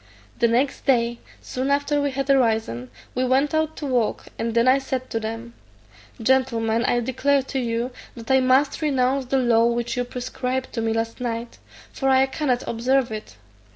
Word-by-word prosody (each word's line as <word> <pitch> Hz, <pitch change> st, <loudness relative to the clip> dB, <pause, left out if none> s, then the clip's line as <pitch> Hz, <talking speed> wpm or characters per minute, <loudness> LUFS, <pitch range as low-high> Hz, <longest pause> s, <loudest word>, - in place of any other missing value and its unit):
The 235 Hz, -, +4 dB
next 255 Hz, +6 st, 0 dB
day, 235 Hz, -3 st, +2 dB, 0.2 s
soon 260 Hz, +2 st, -3 dB
after 285 Hz, +1 st, +1 dB
we 285 Hz, -, +1 dB
had 275 Hz, 0 st, -3 dB
arisen, 220 Hz, -, +1 dB, 0.2 s
we 255 Hz, -, 0 dB
went 265 Hz, +4 st, +2 dB
out 315 Hz, 0 st, 0 dB
to 295 Hz, -, -5 dB
walk, 245 Hz, -5 st, 0 dB
and 230 Hz, 0 st, -2 dB
then 235 Hz, +1 st, +3 dB
I 260 Hz, +2 st, +5 dB
said 260 Hz, -1 st, -4 dB
to 225 Hz, -, -1 dB
them, 225 Hz, +2 st, -6 dB, 0.7 s
"Gentlemen, 230 Hz, -2 st, +1 dB
I 240 Hz, -, +2 dB
declare 265 Hz, +3 st, +1 dB
to 270 Hz, 0 st, -3 dB
you, 235 Hz, +1 st, -2 dB, 0.2 s
that 230 Hz, +1 st, -6 dB
I 265 Hz, -, +6 dB
must 260 Hz, +4 st, +2 dB
renounce 270 Hz, -2 st, +1 dB
the 270 Hz, +2 st, 0 dB
law 235 Hz, -3 st, +4 dB
which 235 Hz, +1 st, -1 dB
you 245 Hz, -, 0 dB
prescribed 255 Hz, +1 st, -4 dB
to 230 Hz, -, -2 dB
me 225 Hz, 0 st, 0 dB
last 225 Hz, +2 st, -2 dB
night, 235 Hz, -1 st, -4 dB, 0.3 s
for 270 Hz, -, 0 dB
I 265 Hz, 0 st, +5 dB
cannot 265 Hz, -2 st, -1 dB
observe 250 Hz, +2 st, +1 dB
it. 215 Hz, -, -7 dB
255 Hz, 185 wpm, -23 LUFS, 230-270 Hz, 0.7 s, I